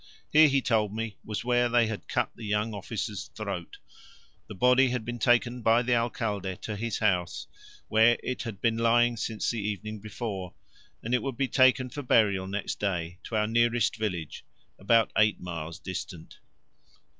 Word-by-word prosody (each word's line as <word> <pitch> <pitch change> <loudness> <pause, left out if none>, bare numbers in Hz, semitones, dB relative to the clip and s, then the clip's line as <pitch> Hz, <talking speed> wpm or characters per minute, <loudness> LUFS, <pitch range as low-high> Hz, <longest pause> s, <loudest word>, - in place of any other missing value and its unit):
Here, 155 +1 +7
he 135 -2 +1
told 110 -4 +1
me, 115 -2 -4
was 110 +1 -5
where 120 0 +2
they 120 -1 +4
had 110 -2 -5
cut - - -1
the 115 - -11
young 105 +1 -1
officer's 100 -3 -5
throat: - - -5 0.7
the 105 - -9
body 125 +6 +4
had 125 -3 -2
been 120 0 -5
taken 120 +1 +2
by 115 +2 +4
the 125 0 +1
Alcalde 105 -5 -1
to 105 - -4
his 115 +1 -3
house, 90 -5 0 0.4
where 115 +2 +4
it 125 - -3
had 110 -6 -6
been 115 +1 +1
lying 120 +1 +3
since 110 -1 -2
the 115 - -3
evening 105 +1 -4
before, 100 -3 -6 0.5
and 115 - -3
it 125 - +3
would 135 -4 -4
be 135 - +1
taken 130 -1 +3
for 145 - -5
burial 100 -7 +2
next 100 +1 -4
day 90 -3 -2
to 115 - -5
our 105 0 +2
nearest 115 0 +2
village, 90 -8 -4 0.4
about 115 +3 +3
eight 110 -1 +3
miles 85 -2 -6
distant. 90 -3 -7
110 Hz, 175 wpm, -28 LUFS, 100-120 Hz, 0.7 s, Here